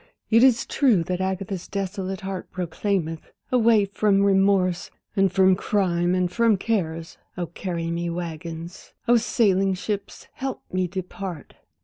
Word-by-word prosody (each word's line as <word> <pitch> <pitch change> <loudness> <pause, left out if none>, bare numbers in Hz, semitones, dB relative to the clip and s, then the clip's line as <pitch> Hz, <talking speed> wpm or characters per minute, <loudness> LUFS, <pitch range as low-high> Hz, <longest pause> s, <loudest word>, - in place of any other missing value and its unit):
it 230 +2 +6
is 245 -3 +4
true 240 - +3
that 180 +2 -2
Agatha's 190 -1 -3
desolate 195 -1 -4
heart, 190 -1 -5
Proclaimeth, 175 -2 -2 0.2
"Away 230 -4 +4
from 200 0 +2
remorse, 195 -2 +2 0.3
and 195 -2 +3
from 190 0 +5
crimes, 180 -2 +1
and 180 -1 0
from 230 0 +3
cares," 165 -6 -2 0.2
Oh, 175 - -1
carry 170 -1 -4
me, 170 0 -2
waggons, 170 0 -6
oh, 240 0 +6
sailing 195 -4 +2
ships, 200 +1 -5
help 265 -1 -5
me 185 0 +1
depart! 180 -2 -6
190 Hz, 135 wpm, -24 LUFS, 175-200 Hz, 0.3 s, it